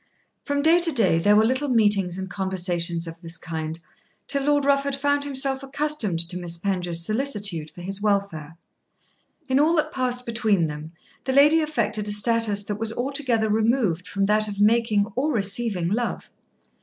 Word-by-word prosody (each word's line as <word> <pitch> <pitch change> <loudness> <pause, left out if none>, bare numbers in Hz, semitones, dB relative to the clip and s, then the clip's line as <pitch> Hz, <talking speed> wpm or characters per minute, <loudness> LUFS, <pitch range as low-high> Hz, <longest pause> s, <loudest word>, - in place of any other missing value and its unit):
From 285 0 -1
day 330 +3 +5
to 340 -1 +2
day 195 - +2
there 205 +5 +3
were 215 +1 +4
little 260 +4 -1
meetings 205 -6 +1
and 190 0 -5
conversations 175 -3 -1
of 165 0 -10
this 165 -1 -6
kind 160 -1 -6 0.5
till 280 -1 0
Lord 290 -1 +2
Rufford 280 0 +1
found 285 +1 0
himself 270 -1 +1
accustomed 275 - -1
to 180 +1 -2
Miss 170 -1 -2
Penge's 175 -2 -1
solicitude 205 - -1
for 175 - -13
his 195 +2 +4
welfare. 195 -7 -2 0.9
In 260 0 +2
all 315 +3 +3
that 305 - 0
passed 250 -1 -1
between 220 -6 +1
them 150 +1 -7 0.3
the 265 - -1
lady 300 +4 +5
affected 300 -8 -2
a - - -1
status 210 -1 +2
that 205 +1 -5
was 225 0 -1
altogether 250 -3 -1
removed 215 -5 0
from 195 -1 -1
that 215 +1 +1
of 200 -1 -6
making 215 -1 +2
or 285 +5 0
receiving 200 - -1
love. 230 +6 -3
215 Hz, 170 wpm, -23 LUFS, 180-270 Hz, 0.9 s, day